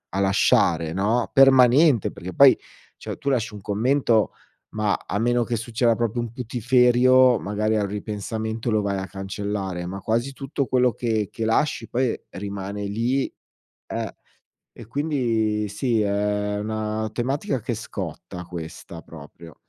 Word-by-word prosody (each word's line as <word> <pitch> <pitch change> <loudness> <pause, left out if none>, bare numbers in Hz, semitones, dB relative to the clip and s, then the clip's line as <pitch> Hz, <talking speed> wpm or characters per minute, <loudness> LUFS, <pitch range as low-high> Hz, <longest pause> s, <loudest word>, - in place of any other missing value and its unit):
a - - 0
lasciare, 85 -4 +2
no, 110 +6 0
permanente, 135 - +5
perché 90 +1 -8
poi 140 -2 +7 0.4
cioè - - -6
tu 140 - -2
lasci 115 -5 0
un 105 - -9
commento 115 +1 +1 0.4
ma 105 -2 0
a - - -2
meno 120 +2 +2
che 120 - -2
succeda 115 +1 +1
proprio 115 +1 -1
un 120 -2 -3
putiferio, 125 +1 +4
magari 105 +2 -1
al 105 -1 0
ripensamento 110 +2 -4
lo 110 -1 +2
vai 100 -1 -1
a 95 - -5
cancellare, 95 -2 -4
ma 100 +2 -6
quasi 120 +6 -1
tutto 135 +1 -3
quello 125 -1 +2
che 110 -2 -1
che 115 - -3
lasci 115 +1 0
poi 125 -1 -1
rimane 100 +1 -5
lì 115 +7 -1 0.6
ehm, - - -3 0.6
e 115 - -12
quindi 115 -6 0
sì, 110 +3 0
è 105 0 -1
una 110 +1 -2
tematica 135 - -2
che 120 - -3
scotta 90 -4 -7
questa 85 0 -8
proprio. 80 +1 -13
110 Hz, 145 wpm, -23 LUFS, 100-125 Hz, 0.6 s, poi